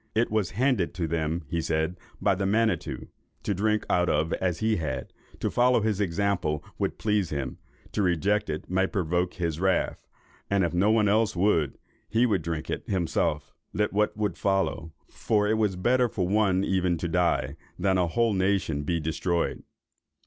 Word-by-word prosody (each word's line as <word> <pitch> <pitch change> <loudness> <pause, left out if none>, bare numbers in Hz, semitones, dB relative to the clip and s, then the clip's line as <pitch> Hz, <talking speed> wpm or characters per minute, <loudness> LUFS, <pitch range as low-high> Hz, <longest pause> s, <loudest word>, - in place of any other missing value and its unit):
It 115 +1 +2
was 110 -5 +1
handed 125 - +1
to 85 - -1
them, 80 +1 -1
he 85 +2 -1
said, 80 +2 -1 0.2
by 100 - +3
the 95 +1 -1
Manitto, 110 +2 0 0.4
to 100 - 0
drink 105 +2 0
out 90 0 +2
of 75 +2 +1
as 90 -3 -1
he 110 0 +1
had; 75 -6 -4 0.3
to - - -1
follow 125 -1 +3
his 105 -2 0
example 90 -5 0 0.2
would - - -1
please 105 -5 0
him—to 70 +8 -5
reject 100 +3 +1
it 75 0 -4
might 95 +1 +1
provoke 90 -2 0
his 85 -3 -2
wrath; 95 0 0 0.4
and 100 -1 +2
if 85 -2 -1
no 95 +4 +3
one 110 -1 +4
else 110 +1 +2
would, 85 -7 +1 0.3
he 115 +2 +3
would 105 -7 +1
drink 80 -1 -4
it - - -5
himself, 80 -5 -1 0.2
let 105 -1 0
what 105 +1 +1
would 105 -4 -2
follow; 95 -5 0 0.2
for 105 -2 0
it 110 +1 +1
was 105 -4 +1
better 120 +6 +2
for 90 -4 -1
one 100 -2 +2
even 90 -3 +1
to 85 - -3
die, 80 -5 +1 0.2
than 95 -1 +2
a 90 - +2
whole 115 +5 +1
nation 95 -5 +1
to 75 - -5
be 85 +2 0
destroyed. 85 +2 -1
95 Hz, 180 wpm, -27 LUFS, 85-105 Hz, 0.4 s, one